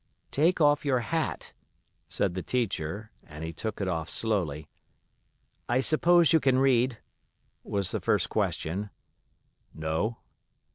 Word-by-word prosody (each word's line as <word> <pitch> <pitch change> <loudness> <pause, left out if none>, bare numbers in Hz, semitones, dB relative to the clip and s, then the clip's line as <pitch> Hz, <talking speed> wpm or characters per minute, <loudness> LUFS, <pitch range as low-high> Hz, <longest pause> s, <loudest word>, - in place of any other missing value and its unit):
"Take 165 +6 +2
off 145 -1 +4
your 130 -4 +1
hat," 160 +5 -3 0.6
said 100 -3 0
the 95 - -3
teacher, 105 -3 -2
and 75 +1 -10
he 80 +1 -5
took 110 +3 -5
it 100 - -1
off 80 -3 -2
slowly. 85 -10 -1 1.0
"I 120 +1 +3
suppose 165 +4 +4
you 160 - +6
can 130 -3 +2
read?" 130 -2 +3 0.7
was 100 -2 -1
the - - -1
first - - +1
question. 95 +6 -2 0.9
"No." 80 +9 -2
110 Hz, 130 wpm, -28 LUFS, 85-135 Hz, 1.0 s, you